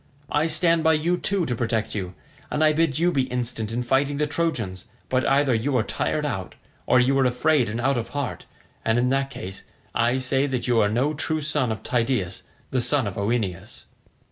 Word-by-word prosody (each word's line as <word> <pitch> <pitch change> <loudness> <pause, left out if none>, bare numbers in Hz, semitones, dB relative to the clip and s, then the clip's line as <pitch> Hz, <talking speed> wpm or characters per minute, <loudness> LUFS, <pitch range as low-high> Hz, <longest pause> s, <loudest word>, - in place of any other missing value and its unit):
I 150 +2 +2
stand 165 +1 +2
by 160 - +5
you 160 +3 +1
too 190 0 0
to 125 - -1
protect 115 -1 -1
you, 90 -3 -4 0.3
and 150 - 0
I 155 0 +5
bid 155 -3 +1
you 175 +2 +3
be 135 -5 +1
instant 120 -3 -2
in 120 +2 -1
fighting 135 +3 +1
the 150 - +1
Trojans; 140 - -2 0.2
but 130 0 +1
either 135 -1 +3
you 125 +4 +1
are 110 - +2
tired 150 +7 -1
out, 95 -10 -4 0.3
or 125 - +5
you 130 +2 +3
are 135 - +4
afraid 125 0 +2
and 110 +2 -3
out 130 +1 +1
of 115 - -5
heart, 140 -3 -4 0.4
and 115 +1 +2
in 125 +1 +2
that 135 +1 +1
case 95 -7 -7 0.3
I 120 +2 +2
say 135 +2 +1
that 130 -3 -2
you 120 -2 +3
are 105 - +3
no 130 +8 +1
true 155 +1 -2
son 145 -5 +1
of 110 - -5
Tydeus 115 -8 -1 0.3
the 130 - +1
son 135 0 +2
of 100 - -4
Oeneus." 100 -4 -2
130 Hz, 210 wpm, -24 LUFS, 115-150 Hz, 0.4 s, by